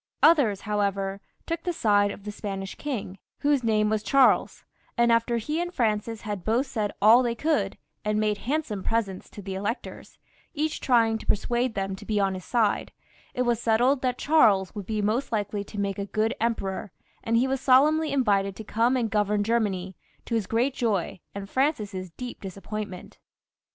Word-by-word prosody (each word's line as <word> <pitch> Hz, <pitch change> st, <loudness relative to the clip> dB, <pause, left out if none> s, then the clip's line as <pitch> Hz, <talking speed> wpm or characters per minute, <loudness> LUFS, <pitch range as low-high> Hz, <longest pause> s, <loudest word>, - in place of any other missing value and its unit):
Others, 265 Hz, -, +5 dB
however, 200 Hz, -2 st, -1 dB, 0.2 s
took 330 Hz, 0 st, -3 dB
the 355 Hz, -, -1 dB
side 205 Hz, -7 st, +3 dB
of 200 Hz, -, -8 dB
the 210 Hz, -, -5 dB
Spanish 195 Hz, -2 st, -5 dB
king, 215 Hz, -10 st, -5 dB, 0.2 s
whose 285 Hz, -3 st, +2 dB
name 215 Hz, -2 st, +2 dB
was 215 Hz, 0 st, 0 dB
Charles, 270 Hz, +4 st, +3 dB, 0.3 s
and 235 Hz, 0 st, +4 dB
after 230 Hz, +1 st, +2 dB
he 300 Hz, +9 st, -2 dB
and 350 Hz, 0 st, -3 dB
Francis 225 Hz, -, -1 dB
had 205 Hz, -4 st, -5 dB
both 235 Hz, +5 st, +1 dB
said 220 Hz, -6 st, -2 dB
all 225 Hz, +4 st, +8 dB
they 240 Hz, -2 st, -1 dB
could, 310 Hz, +6 st, 0 dB, 0.3 s
and 210 Hz, 0 st, 0 dB
made 210 Hz, -1 st, 0 dB
handsome 260 Hz, -7 st, -2 dB
presents 205 Hz, -3 st, -2 dB
to 205 Hz, -, -10 dB
the 190 Hz, 0 st, -5 dB
electors, 205 Hz, +6 st, -5 dB, 0.4 s
each 305 Hz, +1 st, -1 dB
trying 225 Hz, -3 st, +3 dB
to -, -, -12 dB
persuade 240 Hz, +3 st, 0 dB
them 195 Hz, 0 st, -2 dB
to -, -, -11 dB
be 210 Hz, -1 st, -1 dB
on 195 Hz, -1 st, +1 dB
his 185 Hz, -1 st, -6 dB
side, 225 Hz, -4 st, +1 dB, 0.4 s
it 250 Hz, -, +1 dB
was 240 Hz, -2 st, 0 dB
settled 245 Hz, +5 st, +3 dB
that 250 Hz, -1 st, 0 dB
Charles 210 Hz, -, +3 dB
would 205 Hz, -3 st, -7 dB
be 215 Hz, -2 st, -1 dB
most 225 Hz, +6 st, 0 dB
likely 205 Hz, -2 st, -1 dB
to 205 Hz, -, -7 dB
make 200 Hz, -1 st, -2 dB
a 200 Hz, -, -2 dB
good 220 Hz, +3 st, 0 dB
emperor, 210 Hz, -4 st, -2 dB, 0.3 s
and 230 Hz, 0 st, +1 dB
he 250 Hz, +3 st, +3 dB
was 270 Hz, 0 st, -1 dB
solemnly 300 Hz, +5 st, +4 dB
invited 200 Hz, -7 st, +1 dB
to 220 Hz, -, -8 dB
come 230 Hz, +4 st, +1 dB
and 230 Hz, -4 st, -1 dB
govern 210 Hz, -1 st, +1 dB
Germany, 200 Hz, -5 st, -1 dB, 0.3 s
to -, -, -5 dB
his 220 Hz, -4 st, 0 dB
great 245 Hz, +4 st, +1 dB
joy 210 Hz, -9 st, -1 dB, 0.2 s
and 200 Hz, 0 st, -5 dB
Francis's 210 Hz, -, -1 dB
deej) 250 Hz, +4 st, -7 dB
dis 190 Hz, -1 st, -8 dB
appointment. 205 Hz, -2 st, -7 dB
220 Hz, 185 wpm, -26 LUFS, 200-250 Hz, 0.4 s, all